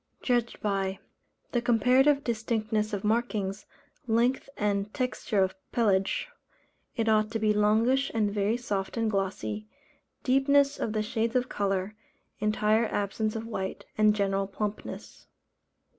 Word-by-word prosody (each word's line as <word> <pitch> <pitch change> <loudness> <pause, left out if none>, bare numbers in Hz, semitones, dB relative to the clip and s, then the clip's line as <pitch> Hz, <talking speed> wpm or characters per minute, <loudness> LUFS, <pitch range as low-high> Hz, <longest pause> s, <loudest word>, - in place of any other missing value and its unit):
Judged 240 -2 0
by: 195 -2 -1 0.5
The 240 - +1
comparative 255 +4 +4
distinctness 220 -2 -1
of 205 -2 -3
markings, 210 -3 -1 0.4
length 240 +4 +1
and 205 0 0
texture 250 -6 0
of 190 0 -1 0.2
pelage 200 -4 +1 0.7
(it 225 -3 -1
ought 215 -1 +3
to 225 - -2
be 215 -1 +2
longish 225 +6 +3
and 210 -3 0
very 205 +3 +1
soft 205 -4 -3
and 225 -1 +1
glossy) 110 - -2 0.6
deepness 280 +2 +3
of 215 - -2
the 215 -1 0
shades 225 +2 -1
of 250 0 +1
colour, 195 0 -1 0.5
entire 215 +1 +2
absence 215 +2 -1
of 225 0 -4
white, 190 -4 -4
and 215 -1 +4
general 195 -1 0
plumpness. 205 +1 -6
215 Hz, 130 wpm, -28 LUFS, 200-235 Hz, 0.7 s, comparative